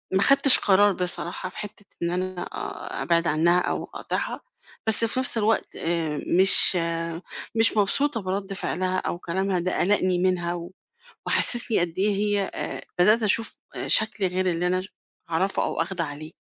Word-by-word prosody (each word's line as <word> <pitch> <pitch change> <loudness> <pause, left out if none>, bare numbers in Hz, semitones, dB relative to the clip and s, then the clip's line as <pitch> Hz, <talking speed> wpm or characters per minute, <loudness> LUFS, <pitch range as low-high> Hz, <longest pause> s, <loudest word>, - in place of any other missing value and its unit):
ما - - +2
اخدتش 275 +5 +6
قرار 200 +1 +3
بصراحة 180 0 -3
في - - -15
حتّة 210 -1 -8 0.2
إن 170 - -2
أنا 185 0 -4
آآ - - -7
أبعد 170 0 +1
عنها 170 +4 +2
أو - - -3
أقاطعها، - - -5 0.5
بس 220 +1 +6
في 230 +3 -3
نفس 260 -2 +2
الوقت 220 +1 -1
آآ 165 -3 -3 0.2
مش 190 +1 +9
آآ 165 -1 -4 0.3
مش 225 0 +2
مبسوطة 230 +5 0
من 185 - -14
رد 195 0 -6
فعلها 185 0 -3
أو 175 - -5
كلامها 190 +2 -2
ده 180 +1 -3
قلقني 185 -2 0
منها 180 -2 -1
و 175 0 -8 0.6
وحسسني 240 -3 +4
قد 170 -1 -3
إيه 200 +2 +1
هي 205 -1 -1
آآ - - -6 0.2
بدأت 215 +6 +3
أشوف 220 +2 +1 0.2
آآ - - -5
شكل 215 -2 +3
غير 185 +1 -2
اللي 175 +1 -3
أنا 185 +1 -1
ش 190 - -12 0.4
أعرفه 185 +4 -1
أو - - -2
آخده 175 0 -4
عليه. 155 +1 -9
185 Hz, 175 wpm, -23 LUFS, 170-205 Hz, 0.6 s, مش